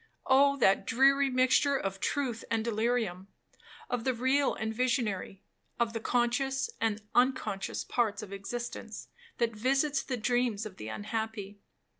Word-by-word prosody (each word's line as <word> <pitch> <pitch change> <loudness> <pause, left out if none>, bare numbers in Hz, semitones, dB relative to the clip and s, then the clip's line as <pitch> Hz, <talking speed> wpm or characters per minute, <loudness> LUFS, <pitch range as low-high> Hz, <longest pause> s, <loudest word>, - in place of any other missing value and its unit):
Oh 280 +1 +5
that 195 -6 +3
dreary 275 +3 +4
mixture 260 +2 +3
of 195 -4 -4
truth 250 -3 -1
and 225 -1 0
delirium, 220 -4 -1 0.6
of 245 -2 -2
the 260 0 0
real 260 +4 +2
and 220 0 -3
visionary, 225 -6 -1 0.4
of 235 -1 +1
the 225 - -2
conscious 250 - 0
and 220 -2 0
unconscious 245 -6 +1
parts 220 -3 -1
of 200 -1 -9
existence, 235 +5 -6 0.3
that 235 -2 0
visits 275 +5 +1
the 255 - -3
dreams 240 -2 0
of 200 -3 -9
the 105 - -7
unhappy! 210 - -4
235 Hz, 140 wpm, -30 LUFS, 215-260 Hz, 0.6 s, Oh